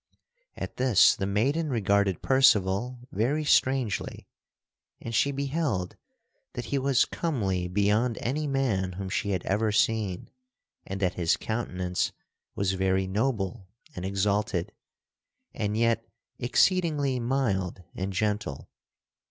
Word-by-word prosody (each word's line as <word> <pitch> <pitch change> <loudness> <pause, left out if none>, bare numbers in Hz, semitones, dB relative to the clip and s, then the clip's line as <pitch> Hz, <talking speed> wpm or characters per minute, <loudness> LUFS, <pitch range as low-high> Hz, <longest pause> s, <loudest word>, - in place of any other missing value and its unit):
At - - -6
this 125 -6 +5
the 95 - -2
maiden 140 +11 +1
regarded 100 - +1
Percival 120 -1 +3
very 135 +10 0
strangely, 130 -7 +1 0.7
and 115 - -7
she 140 +5 +3
beheld 140 - -2 0.6
that 120 - -5
he 140 - +2
was 135 -1 +3
comely 100 - -1
beyond 105 +5 +1
any 150 +5 -2
man 115 -10 0
whom 95 +1 -5
she 100 - -1
had 95 -3 -1
ever 105 +3 +1
seen 105 -3 0 0.6
and 95 0 -4
that 90 -2 +1
his 85 -2 +1
countenance 90 -6 -2 0.4
was 95 -1 0
very 95 0 +1
noble 105 -1 -2 0.3
and 90 - -5
exalted 100 0 0 0.8
and 105 -1 -2
yet 115 0 +2 0.4
exceedingly 145 0 +2
mild 110 -8 -1
and 95 +1 -3
gentle. 105 -6 -2
105 Hz, 120 wpm, -27 LUFS, 95-130 Hz, 0.8 s, this